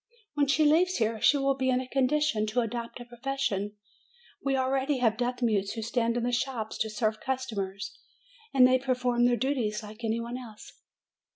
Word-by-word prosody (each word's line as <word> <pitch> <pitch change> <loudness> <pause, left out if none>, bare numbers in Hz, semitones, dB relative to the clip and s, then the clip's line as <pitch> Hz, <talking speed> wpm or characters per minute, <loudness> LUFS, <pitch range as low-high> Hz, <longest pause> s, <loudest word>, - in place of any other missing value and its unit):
When 290 -1 +2
she 305 +2 +3
leaves 350 +5 +4
here, 220 -1 0
she 290 - +5
will 275 0 +2
be 260 -1 -1
in 255 0 +3
a 255 - -5
condition 265 -4 +1
to 220 +4 +1
adopt 235 +1 -4
a 240 - -8
profession. 240 -5 -2 0.7
We 275 -1 +1
already 265 +2 +1
have 230 -3 +2
deaf 245 +1 -2
mutes 205 -4 +1
who 225 -1 -4
stand 230 +1 0
in 240 - -1
the 245 - 0
shops 245 -3 -2
to 220 - 0
serve 215 0 -1
customers, 210 -6 -4 0.5
and 260 -2 +6
they 255 0 +4
perform 250 -2 +1
their 245 0 +3
duties 235 -6 -1
like 215 +2 -11
any 225 +1 0
one 235 +2 -5
else." 220 -4 -11
245 Hz, 190 wpm, -28 LUFS, 220-265 Hz, 0.7 s, and